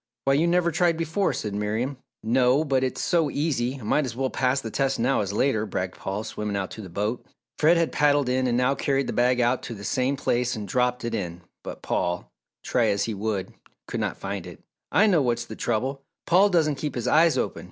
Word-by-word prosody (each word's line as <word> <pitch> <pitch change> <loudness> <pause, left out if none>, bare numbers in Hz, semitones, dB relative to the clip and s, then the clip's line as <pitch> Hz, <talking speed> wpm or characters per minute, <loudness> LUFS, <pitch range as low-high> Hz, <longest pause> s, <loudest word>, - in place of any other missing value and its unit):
"Why 135 - +3
you 155 +5 +3
never 170 0 +2
tried 170 0 +2
before," 165 +4 0
said 105 -2 -4
Miriam. 110 +6 -2 0.3
"No, 125 +5 +3
but 135 -3 +1
it's 130 - -2
so 165 -4 +2
easy! 135 -4 -1
I - - -11
might 150 +8 +2
as 125 -4 -5
well 130 +1 -1
pass 130 +1 +1
the 115 -4 -6
test 135 +2 0
now 125 +2 +2
as 100 -1 -3
later," 110 0 +1
bragged 95 -1 -3
Paul, 100 +3 -4
swimming 105 -2 -4
out 95 -1 -3
to 110 - -8
the 95 - -9
boat. 105 +7 -2 0.4
Fred 165 +3 +5
had 165 -1 +1
paddled 145 -2 +3
in 130 0 +1
and 120 -1 +1
now 125 +2 +3
carried 140 -1 0
the - - -3
bag 125 +1 +2
out 120 +1 +2
to 115 - -6
the 100 - -10
same 130 +6 0
place 125 -2 0
and 105 -2 -6
dropped 125 +2 0
it 120 - -3
in 90 -5 -4 0.2
but - - -8
Paul, 90 0 -2 0.3
try - - +1
as 100 0 +1
he 110 - -2
would, 100 -2 -3 0.3
could - - -3
not - - -2
find 95 -2 -5
it. 90 - -12 0.3
"I 205 - +5
know 180 -8 +4
what's 120 -2 0
the 110 - -8
trouble 130 +6 -2 0.2
Paul 190 +4 +5
doesn't 155 -6 +1
keep 150 - -3
his 120 - -2
eyes 165 +1 +4
open. - - -2
125 Hz, 230 wpm, -25 LUFS, 110-145 Hz, 0.4 s, Fred